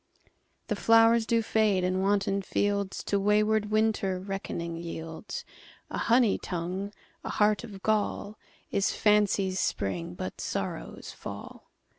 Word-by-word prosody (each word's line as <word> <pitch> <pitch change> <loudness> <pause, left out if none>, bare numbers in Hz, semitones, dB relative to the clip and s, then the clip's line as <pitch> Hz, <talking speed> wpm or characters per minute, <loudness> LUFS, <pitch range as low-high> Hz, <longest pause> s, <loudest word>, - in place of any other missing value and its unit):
The - - -1
flowers 225 0 +5
do 230 -1 +2
fade, 210 -4 +2
and 185 +1 +1
wanton 200 0 +1
fieldsTo 200 0 -1
wayward 210 +1 +3
Winter 215 -3 +1
reckoning 185 -3 -4
yields:A 165 +3 -8
honey 235 -3 +4
tongue, 185 +3 -3 0.3
a - - -4
heart 210 0 +2
of 200 -5 -9
gall, 215 -1 0 0.3
Is 200 - +2
fancy's 200 -3 +3
spring, 90 -3 -2
but 95 +1 -5
sorrow's - - -4
fall. - - -9
200 Hz, 115 wpm, -28 LUFS, 185-215 Hz, 0.3 s, flowers